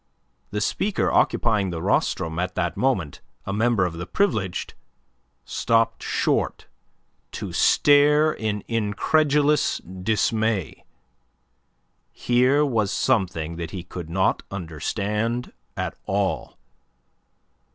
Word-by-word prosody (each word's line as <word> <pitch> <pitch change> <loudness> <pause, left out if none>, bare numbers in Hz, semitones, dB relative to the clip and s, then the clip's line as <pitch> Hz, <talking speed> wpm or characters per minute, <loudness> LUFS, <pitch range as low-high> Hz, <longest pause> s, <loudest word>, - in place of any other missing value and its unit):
The 105 +1 -3
speaker 195 - 0
occupying 105 -5 +2
the 85 -2 -4
rostrum 80 0 0
at 90 0 -2
that 90 -2 -1
moment 95 - -1 0.2
a 100 - -3
member 110 -2 +2
of 90 - -3
the 85 +2 -6
Privileged 110 - -1 0.7
stopped 115 -1 +1
short - - -1 0.7
to - - -5
stare 150 +2 +4
in 105 -2 -3
incredulous 145 +7 +2
dismay. 105 +2 -1 1.3
Here 130 +4 +2
was 110 -7 0
something 90 -10 0
that 85 -1 -4
he 90 +1 -6
could 85 -2 -8
not 95 +3 +1
understand 105 +7 -3 0.2
at - - -2
all. 100 -1 -1
105 Hz, 100 wpm, -24 LUFS, 90-120 Hz, 1.3 s, stare